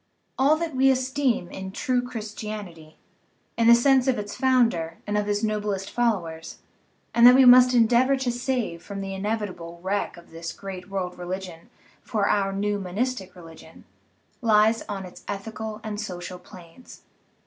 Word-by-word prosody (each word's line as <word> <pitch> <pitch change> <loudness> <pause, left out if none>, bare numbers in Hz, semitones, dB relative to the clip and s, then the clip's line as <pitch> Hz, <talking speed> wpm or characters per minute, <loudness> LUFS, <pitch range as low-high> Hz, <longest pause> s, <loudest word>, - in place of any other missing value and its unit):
All 275 +4 +4
that 320 -2 -4
we 265 +1 +4
esteem 260 -5 0
in 190 0 -7
true 255 +3 0
Christianity, 210 -8 -8 0.6
in 230 0 +2
the 235 - +9
sense 265 +1 +3
of 260 -2 +2
its 205 -1 -5
founder 230 -11 +1
and 210 - -2
of 210 0 0
his 205 +1 -1
noblest 210 -3 -2
followers, 175 -9 -2 0.6
and 235 +1 +7
that 250 - +9
we 265 0 +6
must 250 0 +7
endeavor 245 +3 +4
to 260 -2 -1
save 245 -8 -2
from 200 +1 -7
the 195 0 -5
inevitable 190 -4 -4
wreck 200 -1 -2
of 170 - -16
this 165 0 -6
great 190 -1 -8
world 185 -2 -4
religion 180 -2 -7 0.3
for 210 -4 -1
our 195 -1 +1
new 205 +1 -1
monistic 195 +1 -3
religion, 165 -2 -14 0.6
lies 220 0 +4
on 195 -2 -4
its 180 - -13
ethical 215 +2 -5
and 210 -1 -4
social 180 -3 -7
planes. 180 +4 -15
210 Hz, 160 wpm, -25 LUFS, 185-245 Hz, 0.6 s, the